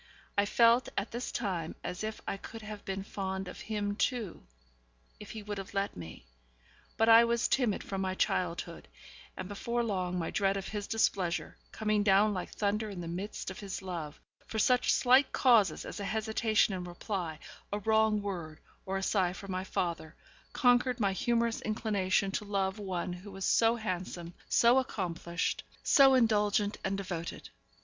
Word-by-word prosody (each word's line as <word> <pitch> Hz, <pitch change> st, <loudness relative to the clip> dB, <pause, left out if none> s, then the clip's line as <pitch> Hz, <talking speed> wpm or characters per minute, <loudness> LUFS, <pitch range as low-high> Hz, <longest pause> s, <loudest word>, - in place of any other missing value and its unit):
I 200 Hz, -, +3 dB
felt 235 Hz, +3 st, +4 dB
at 200 Hz, -, -1 dB
this 240 Hz, +2 st, -4 dB
time 180 Hz, -8 st, -3 dB
as 180 Hz, +3 st, -4 dB
if 215 Hz, 0 st, -4 dB
I -, -, -1 dB
could 225 Hz, +3 st, -9 dB
have 215 Hz, -1 st, -8 dB
been 195 Hz, 0 st, -3 dB
fond 190 Hz, -1 st, -4 dB
of 180 Hz, -, -8 dB
him 205 Hz, -2 st, -2 dB
too, 225 Hz, -5 st, -1 dB, 0.8 s
if -, -, -10 dB
he 220 Hz, -1 st, -7 dB
would 205 Hz, -1 st, -4 dB
have 195 Hz, -, -9 dB
let 195 Hz, 0 st, -1 dB
me; 80 Hz, -8 st, -9 dB, 0.7 s
but 225 Hz, -, +3 dB
I 230 Hz, +1 st, +9 dB
was 235 Hz, 0 st, +1 dB
timid 240 Hz, -7 st, +1 dB
from 195 Hz, -1 st, -4 dB
my 185 Hz, -1 st, -1 dB
childhood, 175 Hz, -, -1 dB, 0.5 s
and -, -, -5 dB
before 235 Hz, +4 st, -2 dB
long 185 Hz, -5 st, -1 dB
my 170 Hz, -, -2 dB
dread 195 Hz, -1 st, +1 dB
of 195 Hz, -, -5 dB
his 205 Hz, -1 st, -4 dB
displeasure 190 Hz, -6 st, 0 dB, 0.2 s
(coming 215 Hz, -1 st, +1 dB
down 205 Hz, +1 st, +4 dB
like 185 Hz, -, -4 dB
thunder 210 Hz, +1 st, -1 dB
into 190 Hz, -3 st, -6 dB
the 170 Hz, -, -6 dB
midst 190 Hz, +3 st, -5 dB
of 185 Hz, -, -9 dB
his 195 Hz, -1 st, -6 dB
love, 165 Hz, -5 st, -5 dB, 0.3 s
for 220 Hz, -, -5 dB
such 250 Hz, +3 st, +3 dB
slight 260 Hz, +2 st, +5 dB
causes 225 Hz, -, +4 dB
as -, -, -7 dB
a 200 Hz, -, -3 dB
hesitation 220 Hz, 0 st, +1 dB
in 185 Hz, -1 st, -3 dB
reply, 175 Hz, -2 st, -4 dB, 0.3 s
a 205 Hz, -, 0 dB
wrong 220 Hz, 0 st, +2 dB
word, 170 Hz, -6 st, -5 dB, 0.3 s
or 195 Hz, 0 st, -1 dB
a 195 Hz, -, -3 dB
sigh 185 Hz, -3 st, +1 dB
for 195 Hz, +1 st, -10 dB
my 185 Hz, 0 st, -2 dB
father), 170 Hz, -4 st, -3 dB, 0.4 s
conquered 245 Hz, -1 st, +3 dB
my 200 Hz, -3 st, +2 dB
humorous 235 Hz, +3 st, 0 dB
inclination 200 Hz, -3 st, 0 dB
to 200 Hz, -, -2 dB
love 195 Hz, -1 st, -1 dB
one 185 Hz, -3 st, -3 dB
who 180 Hz, +3 st, -9 dB
was 195 Hz, 0 st, -4 dB
so 230 Hz, 0 st, +4 dB
handsome, 180 Hz, -5 st, -4 dB, 0.2 s
so 240 Hz, +3 st, +5 dB
accomplished, 175 Hz, -7 st, -2 dB, 0.2 s
so 270 Hz, -1 st, +6 dB
indulgent 210 Hz, -3 st, +2 dB
and 195 Hz, 0 st, -1 dB
devoted. 175 Hz, -4 st, -5 dB
200 Hz, 175 wpm, -31 LUFS, 185-220 Hz, 0.8 s, I